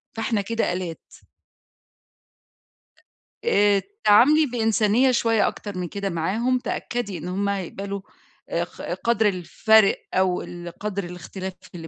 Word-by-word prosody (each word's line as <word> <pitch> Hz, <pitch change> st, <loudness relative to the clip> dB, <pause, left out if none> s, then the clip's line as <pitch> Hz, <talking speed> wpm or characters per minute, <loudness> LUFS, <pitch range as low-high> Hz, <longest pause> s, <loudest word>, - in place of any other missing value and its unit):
فإحنا 225 Hz, -1 st, 0 dB
كده 230 Hz, -1 st, -1 dB
آلات. 175 Hz, -2 st, -5 dB, 2.4 s
آآ، 205 Hz, -, +4 dB, 0.2 s
تعاملي 295 Hz, +9 st, +6 dB
بإنسانية 230 Hz, 0 st, +2 dB
شوية 225 Hz, -3 st, +2 dB
أكتر 205 Hz, -3 st, -5 dB
من 180 Hz, -1 st, -2 dB
كده 200 Hz, +3 st, -3 dB
معاهم، 215 Hz, +10 st, 0 dB
تأكدي 240 Hz, -5 st, -3 dB
إن 170 Hz, -, -7 dB
هُم 200 Hz, +2 st, -1 dB
هيقبلوا 200 Hz, +1 st, -4 dB, 0.5 s
آآ 170 Hz, -, 0 dB
ق 175 Hz, -, -11 dB, 0.2 s
قَدر 230 Hz, -2 st, +2 dB
الفَرق 200 Hz, +3 st, +3 dB, 0.2 s
أو 185 Hz, -1 st, +2 dB
ال 175 Hz, 0 st, -8 dB
قَدر 200 Hz, -1 st, -3 dB
الإختلاف 180 Hz, +2 st, -7 dB, 0.2 s
اللي 165 Hz, -1 st, -8 dB
200 Hz, 120 wpm, -24 LUFS, 180-225 Hz, 2.4 s, تعاملي